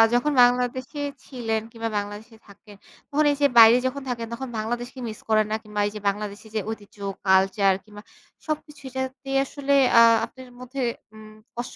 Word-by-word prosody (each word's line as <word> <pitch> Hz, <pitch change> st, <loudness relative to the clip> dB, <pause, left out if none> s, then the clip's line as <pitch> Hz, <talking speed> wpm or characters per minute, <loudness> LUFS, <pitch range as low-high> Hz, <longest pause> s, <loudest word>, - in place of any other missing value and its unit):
যখন 295 Hz, +5 st, +2 dB
বাংলাদেশে 250 Hz, +3 st, 0 dB, 0.3 s
ছিলেন 225 Hz, -4 st, -2 dB
কিংবা 230 Hz, -1 st, -4 dB
বাংলাদেশে 205 Hz, +3 st, -6 dB
থাকেন, 205 Hz, +1 st, -16 dB, 0.3 s
তখন 300 Hz, +1 st, +2 dB
এই 285 Hz, -, -2 dB
যে 285 Hz, -, +6 dB
বাইরে 230 Hz, +1 st, +9 dB
যখন 280 Hz, +2 st, -4 dB
থাকেন 230 Hz, -2 st, -3 dB
তখন 265 Hz, +2 st, -5 dB
বাংলাদেশকে 240 Hz, +4 st, -4 dB
মিস 215 Hz, -, -9 dB
করেন 215 Hz, -1 st, +4 dB
না? -, -, +1 dB
কিংবা 210 Hz, -1 st, -6 dB
এই -, -, -4 dB
যে -, -, -5 dB
বাংলাদেশি 205 Hz, +1 st, -6 dB
যে -, -, +2 dB
ঐতিহ্য 210 Hz, -2 st, -8 dB, 0.3 s
কালচার 190 Hz, +1 st, +4 dB
কিংবা 210 Hz, -1 st, -13 dB, 0.5 s
সবকিছু 300 Hz, -1 st, -5 dB
যাতে 260 Hz, +1 st, -5 dB, 0.2 s
আসলে 280 Hz, 0 st, -2 dB, 0.3 s
আ -, -, +9 dB, 0.2 s
আপনার 260 Hz, -1 st, -14 dB
মধ্যে 255 Hz, +2 st, -6 dB, 0.3 s
উম 215 Hz, 0 st, -13 dB, 0.2 s
কষ্ট 240 Hz, +1 st, -6 dB
230 Hz, 170 wpm, -24 LUFS, 215-260 Hz, 0.5 s, বাইরে